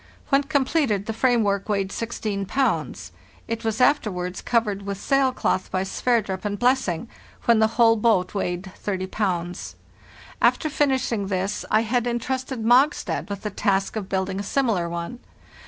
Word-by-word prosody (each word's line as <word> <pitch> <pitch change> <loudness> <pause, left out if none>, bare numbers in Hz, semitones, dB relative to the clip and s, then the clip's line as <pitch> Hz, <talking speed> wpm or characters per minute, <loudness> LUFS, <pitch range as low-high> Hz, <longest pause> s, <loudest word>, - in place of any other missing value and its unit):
When 275 0 +4
com 280 -1 +1
pleted 250 - +1
the 225 - -3
frame 240 0 +2
work 200 0 -1
weighed 195 -2 0
16 215 -4 -3
pounds. 265 +5 -1 0.4
It 230 +1 -3
was 220 +1 -1
after 250 -3 +3
wards 180 0 -4
covered 215 -4 0
with 200 0 -5
sail 275 +3 +2
cloth 190 -6 -1
by 185 0 -1
Sverdrup 200 -2 0
and 205 -1 -2
Blessing, 245 -6 +1 0.4
when 230 -2 +5
the 220 - +5
whole 230 -1 +6
boat 210 -5 +2
weighed 185 -1 -3
30 190 -2 -3
pounds. 180 -3 -3 0.7
After 310 - +3
finishing 260 -8 +1
this 195 +1 -2
I 215 - +4
had 240 +1 0
intrusted 255 +1 -2
Mogstad 255 0 +3
with 200 -1 -5
the 210 - -3
task 195 0 0
of 205 -3 -4
building 190 0 -1
a - - -3
similar 205 -7 0
one. 170 +8 -5
215 Hz, 165 wpm, -24 LUFS, 195-245 Hz, 0.7 s, whole